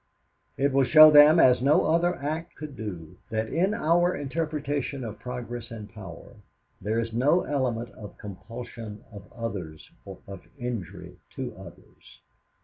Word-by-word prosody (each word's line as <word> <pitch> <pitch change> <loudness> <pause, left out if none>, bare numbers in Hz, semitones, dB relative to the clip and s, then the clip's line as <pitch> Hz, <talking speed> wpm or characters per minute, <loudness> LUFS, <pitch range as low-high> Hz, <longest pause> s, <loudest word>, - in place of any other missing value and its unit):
It 140 0 +1
will 135 0 +4
show 155 +4 +9
them 150 +2 +8
as 125 -4 +5
no 140 +4 +4
other 170 +3 +2
act 155 +4 -5
could 150 -3 -8
do 90 -7 -8
that 110 0 -2
in 190 +6 +1
our 175 +1 +2
interpretation 145 -2 -3
of 110 -2 -7
progress 120 -1 -6
and 110 -3 -9
power, 100 +3 -11 0.4
there 110 +3 -1
is 115 -1 -3
no 145 +9 +3
element 125 -5 -2
of 105 -2 -12
compulsion 110 +1 -9
of 100 -2 -12
others 95 -10 -7
or - - -10
of 100 0 -10
injury 105 -8 -6 0.2
to - - -5
others. - - -15
125 Hz, 145 wpm, -26 LUFS, 110-150 Hz, 0.4 s, show